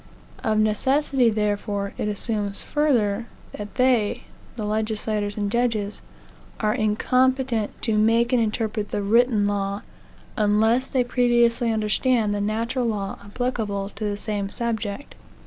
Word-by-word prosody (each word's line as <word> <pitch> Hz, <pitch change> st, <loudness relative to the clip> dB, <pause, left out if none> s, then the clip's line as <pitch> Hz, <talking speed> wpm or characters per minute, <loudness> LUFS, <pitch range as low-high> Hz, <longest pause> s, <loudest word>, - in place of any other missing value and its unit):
Of 215 Hz, -1 st, +1 dB
necessity, 255 Hz, +4 st, +2 dB
therefore, 205 Hz, -1 st, -1 dB
it -, -, -2 dB
assumes 205 Hz, -1 st, -2 dB
further, 235 Hz, -7 st, +1 dB, 0.2 s
that 210 Hz, 0 st, -8 dB
they 250 Hz, -5 st, +2 dB, 0.3 s
(the 215 Hz, -3 st, -4 dB
legislators 215 Hz, -1 st, -1 dB
and 205 Hz, -1 st, -1 dB
judges) 225 Hz, -4 st, 0 dB, 0.6 s
are 215 Hz, -1 st, +1 dB
incompetent 250 Hz, +2 st, +1 dB
to 220 Hz, -3 st, +1 dB
make 230 Hz, +3 st, +3 dB
and 245 Hz, -, +4 dB
interpret 215 Hz, -1 st, -1 dB
the 205 Hz, -, -2 dB
written 225 Hz, 0 st, +3 dB
law, 200 Hz, 0 st, -1 dB, 0.5 s
unless 220 Hz, +5 st, +3 dB
they 255 Hz, -2 st, +1 dB
previously 240 Hz, -1 st, +2 dB
understand 220 Hz, +1 st, +1 dB
the 205 Hz, -, -1 dB
natural 230 Hz, +4 st, -1 dB
law 200 Hz, -3 st, -3 dB
applicable 205 Hz, -3 st, -2 dB
to 215 Hz, -, -8 dB
the 205 Hz, -1 st, -1 dB
same 205 Hz, -2 st, -3 dB
subject. 230 Hz, +2 st, -3 dB
215 Hz, 130 wpm, -24 LUFS, 205-240 Hz, 0.6 s, and